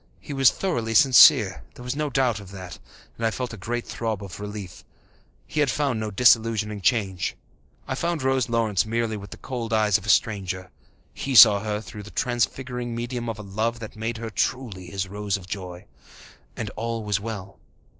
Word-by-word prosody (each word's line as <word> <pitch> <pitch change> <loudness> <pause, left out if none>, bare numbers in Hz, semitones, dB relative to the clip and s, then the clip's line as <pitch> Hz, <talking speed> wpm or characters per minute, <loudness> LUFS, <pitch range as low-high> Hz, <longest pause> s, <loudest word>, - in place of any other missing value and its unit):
He 145 - -8
was 135 -2 +6
thoroughly 115 -12 -2
sincere, 130 +2 +7
there 125 - -11
was 125 +2 -3
no 150 0 -1
doubt 125 -5 +1
of 100 -2 -11
that, 95 -2 -9 0.4
and 115 - -8
I 115 - +3
felt 125 +1 -4
a - - -5
great 120 +4 -4
throb 110 -3 -3
of 90 -2 -9
relief. 105 -3 -7 0.6
He 155 - -4
had 145 -3 +3
found 135 -4 0
no 110 0 -3
disillusioning 110 -1 +3
change. 95 -5 0 0.5
I - - -2
saw 170 +5 -1
Rose 130 -2 +1
Lawrence 110 -5 +1
merely 115 0 -1
with 100 -1 -8
the - - -10
cold 120 -3 -5
eyes 105 -2 +3
of - - -15
the 105 - -6
stranger. 95 -1 +1 0.4
He 135 -1 -3
saw 100 -1 +10
her 105 0 -3
through 105 -1 -9
the 105 - -10
transfiguring 125 0 -2
medium 120 0 -4
of 115 - -4
a 105 - -8
love 110 +4 -2
that 110 -2 -9
made 115 +2 -3
her 115 0 -6
truly 105 -4 -2
his 95 +2 -3
Rose 100 0 -2
of 95 - -12
joy. 90 -2 -7 0.7
And - - -4
all 115 0 -4
was 105 -1 0
well. 100 -3 -7
110 Hz, 195 wpm, -24 LUFS, 100-120 Hz, 0.7 s, saw